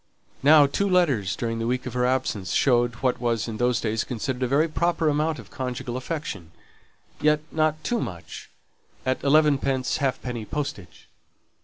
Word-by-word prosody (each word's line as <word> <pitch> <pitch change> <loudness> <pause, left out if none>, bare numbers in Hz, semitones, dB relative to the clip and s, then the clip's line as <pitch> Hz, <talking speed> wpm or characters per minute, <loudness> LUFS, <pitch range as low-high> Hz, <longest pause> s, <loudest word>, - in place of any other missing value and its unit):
Now 145 +1 +7
two 200 +8 0
letters 140 - +2
during 115 -1 -3
the 115 - -2
week 125 +1 -1
of 125 - -5
her 125 0 +1
absence 120 -8 -1
showed 120 -3 +3
what 125 -1 +1
was 120 -2 0
in 110 -2 -5
those 125 0 +1
days 110 0 -1
considered 125 +1 -4
a 125 - +1
very 145 +6 +3
proper 165 0 +1
amount 155 +2 0
of - - -12
conjugal 125 -2 -4
affection. 130 - -5 0.7
Yet 150 0 +3
not 155 0 0
too 240 - 0
much 85 -2 -7 0.6
at 130 0 0
elevenpence 140 -3 +2
halfpenny 125 -4 -2
postage. 140 - -6
130 Hz, 160 wpm, -25 LUFS, 120-150 Hz, 0.7 s, Now